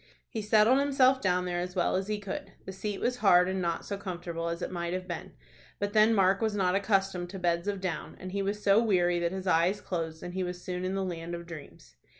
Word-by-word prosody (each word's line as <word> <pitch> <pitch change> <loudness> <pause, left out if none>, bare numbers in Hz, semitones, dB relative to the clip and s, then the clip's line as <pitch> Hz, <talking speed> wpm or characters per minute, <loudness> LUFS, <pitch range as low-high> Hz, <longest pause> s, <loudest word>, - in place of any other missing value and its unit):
He 220 - -4
settled 215 +5 +4
himself 270 -2 +3
down 180 -1 +1
there 175 -1 -2
as 180 +1 -4
well 175 - +1
as 190 +1 -1
he 210 0 -1
could. 200 -2 -6
The - - -5
seat 200 +1 -4
was 250 0 0
hard, 180 -5 +5
and 190 0 -1
not 170 -1 -2
so 200 - -4
comfortable 170 -3 -4
as 170 +1 -4
it - - -3
might 170 -1 -3
have 185 0 -4
been; 175 -3 -6 0.4
but 205 0 -2
then 220 +1 +5
Mark 195 0 +3
was 220 -2 0
not 185 -3 +2
accustomed 195 -3 +1
to 195 - -7
beds 175 0 0
of 200 -1 -1
down, 185 -3 -4
and 185 - -7
he 200 +1 -1
was 205 +1 -2
so 200 +2 +5
weary 175 -6 +2
that 170 0 0
his 190 0 -5
eyes 180 +3 +3
closed 165 -3 -4
and 175 - -6
he 190 - -2
was 180 0 -4
soon 180 0 -4
in 185 +1 -1
the 195 -1 -1
land 170 -1 -4
of 170 0 -8
dreams. 140 - -11
185 Hz, 250 wpm, -29 LUFS, 175-205 Hz, 0.4 s, hard